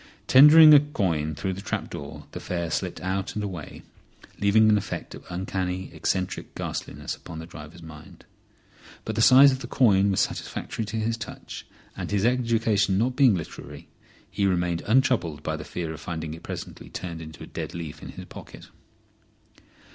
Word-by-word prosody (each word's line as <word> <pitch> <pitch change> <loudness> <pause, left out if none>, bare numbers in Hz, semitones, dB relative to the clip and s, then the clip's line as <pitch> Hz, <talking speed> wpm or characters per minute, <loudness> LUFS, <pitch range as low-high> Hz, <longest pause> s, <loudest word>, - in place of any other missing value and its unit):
Tendering 155 +3 +9
a 145 - +10
coin 85 - -1
through 95 +4 -3
the 95 - -7
trap - - -4
door 70 - -8
the - - -6
fare 85 -2 -3
slipped - - -2
out 95 +1 -3
and 105 - -2
away, 90 -7 -7 0.6
leaving 105 +2 +4
an 105 - +5
effect 105 - -4
of - - -11
uncanny, 95 0 -3
eccentric 95 -1 -3
ghastliness - - -5
upon 80 - -10
the 80 - -7
driver's 80 0 -11
mind. 80 -1 -13 0.8
But 110 - -3
the 115 - 0
size 135 +4 +8
of 130 - -3
the 125 - -7
coin 100 -6 +3
was 95 - +1
satisfactory 110 - -3
to 105 +2 -5
his 115 +1 -1
touch, 115 - -9 0.3
and - - -5
his 100 0 +1
education 115 -5 +2
not 125 +4 +1
being 130 -7 +5
literary, 80 -4 -8 0.4
he 100 - 0
remained 90 -2 0
untroubled 105 - +2
by 80 - -2
the 75 - -7
fear 85 -2 -5
of 80 - -10
finding 80 -2 -5
it 80 - -10
presently - - -8
turned 80 -3 -7
to - - -11
a - - -7
dead 85 - -6
leaf 80 -3 -7
in - - -9
his - - -9
pocket. - - -12
95 Hz, 180 wpm, -25 LUFS, 85-115 Hz, 0.8 s, a